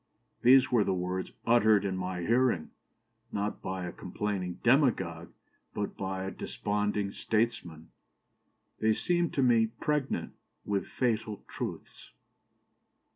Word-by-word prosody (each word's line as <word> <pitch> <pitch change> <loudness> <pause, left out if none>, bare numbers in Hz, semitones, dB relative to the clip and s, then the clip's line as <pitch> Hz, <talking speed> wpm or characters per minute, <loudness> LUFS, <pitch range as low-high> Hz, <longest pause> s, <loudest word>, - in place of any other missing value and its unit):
These 130 +2 +6
were 120 -4 +4
the 95 -1 0
words 90 +1 -3
uttered 110 -3 +4
in 95 -1 -1
my 90 -1 -3
hearing, 115 -3 +2 0.6
not 105 +1 -2
by 95 -1 -4
a 90 - -4
complaining 95 -1 -3
demagogue, 95 - +2 0.4
but 105 - -3
by 95 -1 -3
a 95 - -3
desponding 105 0 -2
statesman. 105 -9 -2 0.9
They 110 0 +3
seemed 175 +7 +1
to 135 - +2
me 115 -3 +4
pregnant 145 - -1 0.3
with 100 -2 -1
fatal 110 -4 -1
truths. - - -7
105 Hz, 120 wpm, -30 LUFS, 95-120 Hz, 0.9 s, These